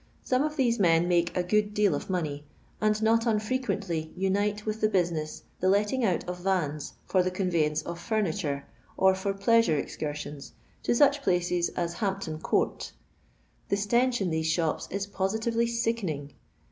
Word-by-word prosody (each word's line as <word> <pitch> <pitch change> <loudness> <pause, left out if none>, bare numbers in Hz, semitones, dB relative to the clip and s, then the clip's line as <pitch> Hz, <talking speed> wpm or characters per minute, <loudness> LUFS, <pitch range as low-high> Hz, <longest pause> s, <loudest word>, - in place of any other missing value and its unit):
Some 255 0 +1
of 305 +1 -1
these 240 -5 +2
men 170 -2 +4
make 175 0 +1
a 180 - +2
good 210 +3 +1
deal 210 -2 +3
of - - -4
money, 155 -6 -2 0.4
and 215 0 +2
not 230 +1 +3
unfrequently 210 -8 -1
unite 205 +3 0
with 215 0 -3
the 215 - +3
busineu 170 -6 -1 0.2
the 185 - +2
letting 210 +6 +2
out 185 -6 0
of 180 0 -4
vans 170 -6 -1
for 185 - +2
the 180 - +1
conveyance 165 -5 0
of 170 0 -6
furniture, 175 -10 -1 0.3
or 190 0 +5
for 190 +1 -2
pleasure 200 -5 +3
excursioni, 145 -1 -5 0.3
to - - +1
such 285 +2 +4
places 175 -4 +1
as 170 -1 -1
Hampton 190 -6 -2
Court. - - -1 0.8
The 200 - +2
stench 240 +4 +2
in 180 -3 0
these 160 0 0
shops 160 -2 0
is 200 +1 -2
positively 220 +4 0
sickening. 220 -12 -2
190 Hz, 160 wpm, -28 LUFS, 170-215 Hz, 0.8 s, or